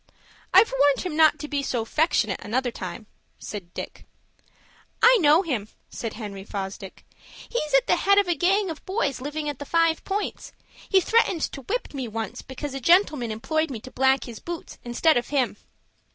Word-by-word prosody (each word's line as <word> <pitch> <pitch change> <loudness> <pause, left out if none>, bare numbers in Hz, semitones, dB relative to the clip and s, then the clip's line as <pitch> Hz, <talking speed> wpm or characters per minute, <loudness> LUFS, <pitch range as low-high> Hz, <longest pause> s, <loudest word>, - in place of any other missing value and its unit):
"I've 390 0 +6
warned 285 0 +4
him 360 -4 -4
not 315 0 +5
to 300 - -6
be 285 -1 -1
so 245 -4 -2
'fectionate 230 - +1
another 245 +4 -1
time," 185 +1 -7 0.3
said 190 -5 -8
Dick. - - -8 0.9
"I - - +7
know 310 +4 +5
him," 245 - -2 0.2
said 230 -2 -5
Henry 205 -3 -7
Fosdick. 195 -1 -7 0.4
"He's 305 -9 -1
at - - +4
the - - +2
head 400 0 +3
of 405 -2 +4
a 350 - +2
gang 375 +4 +1
of 315 - -9
boys 285 - -1
living 295 +2 -4
at 290 -3 -4
the - - -4
Five 330 +2 +1
Points. 405 +2 -4 0.4
He 380 - +5
threatened 390 -5 +2
to 275 - -8
whip 445 - -3
me 265 -3 -4
once 225 0 -5
because 270 +1 -7
a 270 - -4
gentleman 300 - +3
employed 315 +9 -1
me 245 -5 -5
to 255 - -11
black 265 -1 +2
his 230 -3 -9
boots 340 -1 -7
instead 250 +5 +2
of 240 - -1
him." 260 -7 0
285 Hz, 185 wpm, -25 LUFS, 235-335 Hz, 0.9 s, I